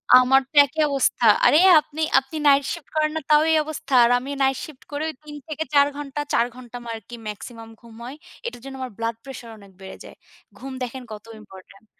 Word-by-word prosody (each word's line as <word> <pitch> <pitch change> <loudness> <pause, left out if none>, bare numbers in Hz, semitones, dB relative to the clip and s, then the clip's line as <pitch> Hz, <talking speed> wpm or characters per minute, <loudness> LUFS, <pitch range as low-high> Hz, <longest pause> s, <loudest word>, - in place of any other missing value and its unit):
আমার 255 +2 +5
তো - - -26
একই 300 +3 -4
অবস্থা। 270 -3 0 0.2
আরে, 300 - +6 0.2
আপনি 305 +1 -8 0.2
আপনি 270 +4 -13
night 280 0 +5
shift 335 -4 -7
করেন 305 0 +1
না, - - -1
তাও 300 0 +6
এই 320 - +4
অবস্থা। 310 -2 -7
আর 235 - +4
আমি 260 +3 -9
night 270 -1 +2
shift 300 -4 -12
করেও 305 +2 -3
৩-৪- 295 0 -1
ঘণ্টা 290 -1 -6
৪ 235 - +3
ঘণ্টা 245 -2 -12
মা - - -8
আমার 230 - -4
আরকি 220 +2 -12
maximum 225 +2 -9
ঘুম 230 -1 -16
হয়। 260 +3 -8 0.3
এটার 470 - -6
জন্য 270 0 -9
আমার 255 - -5
blood 230 0 -3
pressure 255 -4 -10
অনেক 200 -2 -17
বেড়ে 190 - -9
যায়। - - -13 0.4
ঘুম 270 +1 -9
দেখেন 250 +1 -6
কত 210 0 -9
ইম্পর্টেন্ট। 195 0 -16
270 Hz, 205 wpm, -22 LUFS, 235-295 Hz, 0.4 s, আরে